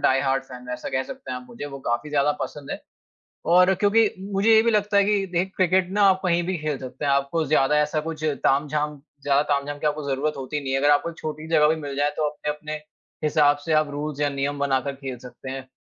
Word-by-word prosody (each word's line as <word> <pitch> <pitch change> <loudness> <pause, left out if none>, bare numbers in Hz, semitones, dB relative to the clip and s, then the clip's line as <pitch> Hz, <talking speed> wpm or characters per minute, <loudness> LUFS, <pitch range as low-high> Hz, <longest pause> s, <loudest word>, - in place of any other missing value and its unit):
Die-heart-fan, 135 -1 -1
वैसा 125 0 -4
कह 130 - 0
सकते 130 - -9
हैं 125 - -3
आप 125 - -14
मुझे 120 +4 -7
वो 135 -1 -8
काफ़ी 120 +6 -1
ज़्यादा 145 0 +2
पसंद 145 -2 -7
है। - - -4 0.7
और 180 +2 +6
क्योंकि 210 +3 +3 0.2
मुझे 200 +3 +2
ये 220 - +7
भी 230 - +2
लगता 210 -1 +1
है 200 - +6
कि 200 -1 +1
देख 180 +1 -1
क्रिकेट 185 0 +3
ना 205 +1 +2
आप 190 0 +3
कहीं 175 -1 +2
भी 185 0 -1
खेल 150 -2 -2
सकते 130 +2 -7
हैं। 140 - +2
आपको 140 +4 +1
ज़्यादा 150 0 +3
ऐसा 150 +1 -1
कुछ 155 0 -6 0.2
तामझाम 150 +1 +1 0.2
ज़्यादा 140 0 +3
तामझाम 145 +1 -3
की 150 - -2
आपको 150 0 0
ज़रूरत 140 +3 -1
होती 135 +2 -4
नहीं 135 -2 -3
है। 135 - +2
अगर 145 +2 +3
आपको 145 +3 +3
छोटी 155 -1 -6
जगह 155 -2 +4
भी 160 - +2
मिल 140 -2 -5
जाए 145 +1 +2
तो 155 -1 +1
अपने-अपने 150 +1 -5 0.5
हिसाब 150 -1 +4
से 165 - -1
आप 155 -1 +3
रुल्स 145 0 -4
या 145 - +2
नियम 140 +1 -2
बनाकर 140 -1 0
खेल 135 -2 -6
सकते 125 +2 -10
हैं। 135 0 -7
150 Hz, 230 wpm, -24 LUFS, 140-160 Hz, 0.7 s, ये